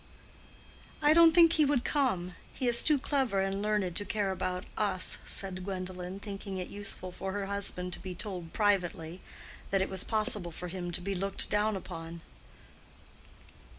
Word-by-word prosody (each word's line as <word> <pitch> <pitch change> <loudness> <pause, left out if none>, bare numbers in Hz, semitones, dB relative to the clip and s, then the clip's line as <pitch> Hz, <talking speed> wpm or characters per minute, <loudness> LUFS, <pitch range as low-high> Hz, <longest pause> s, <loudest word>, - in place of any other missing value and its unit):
"I 295 +1 +7
don't 335 0 +8
think 335 -1 +7
he 310 - +4
would 280 -4 +2
come. 190 -12 0 0.2
He 255 - -1
is 235 -1 +5
too 305 -2 +4
clever 265 -7 0
and 195 +1 -1
learned 210 -4 0
to 205 - 0
care 205 -2 -1
about 185 0 -2
us," 200 -4 +1
said 185 -2 -4
Gwendolen, 185 -1 -5
thinking 200 -1 -6
it 180 - -4
useful 200 -2 -6
for 190 +1 -5
her 200 -1 -2
husband 195 -2 -2
to - - -2
be 185 -1 -6
told 180 -4 -5
(privately) 180 -4 0 0.5
that 195 - +2
it - - -4
was 190 -1 0
possible 210 -5 +2
for 180 +2 -7
him 175 -1 -4
to 175 - -1
be 195 +2 -2
looked 195 +1 -1
down 210 +1 +2
upon. 165 -3 -7
195 Hz, 170 wpm, -31 LUFS, 180-210 Hz, 0.5 s, don't